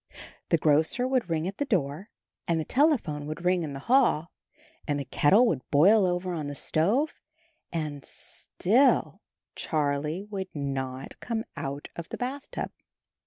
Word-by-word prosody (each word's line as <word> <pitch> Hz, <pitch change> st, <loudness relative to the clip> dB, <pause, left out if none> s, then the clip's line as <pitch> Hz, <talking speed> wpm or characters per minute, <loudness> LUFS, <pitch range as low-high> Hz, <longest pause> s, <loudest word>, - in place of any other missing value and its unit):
The 165 Hz, -, +4 dB
grocer 160 Hz, -, +3 dB
would 255 Hz, -7 st, 0 dB
ring 165 Hz, +1 st, 0 dB
at 195 Hz, -, -5 dB
the 285 Hz, -, +1 dB
door, 175 Hz, -, -1 dB, 0.4 s
and 170 Hz, -1 st, +1 dB
the 155 Hz, -, -2 dB
telephone 240 Hz, -, +1 dB
would 155 Hz, +3 st, -6 dB
ring 180 Hz, 0 st, +3 dB
in 150 Hz, -4 st, -4 dB
the 135 Hz, -, -7 dB
hall, 235 Hz, -, +3 dB, 0.6 s
and 145 Hz, -2 st, 0 dB
the 140 Hz, -, -4 dB
kettle 200 Hz, -, +4 dB
would 160 Hz, -, +1 dB
boil 190 Hz, +7 st, +5 dB
over 180 Hz, 0 st, -1 dB
on 155 Hz, -4 st, -3 dB
the 145 Hz, -, -5 dB
stove, 215 Hz, -, +1 dB, 0.6 s
and 150 Hz, -4 st, -3 dB
still 250 Hz, +9 st, +1 dB, 0.3 s
Charlie 150 Hz, +3 st, -1 dB
would 200 Hz, -2 st, -5 dB
not 135 Hz, -2 st, -4 dB
come 225 Hz, -2 st, -2 dB
out 140 Hz, +1 st, -5 dB
of 170 Hz, -1 st, -7 dB
the -, -, -5 dB
bathtub. 265 Hz, +3 st, -4 dB
170 Hz, 155 wpm, -28 LUFS, 145-215 Hz, 0.6 s, boil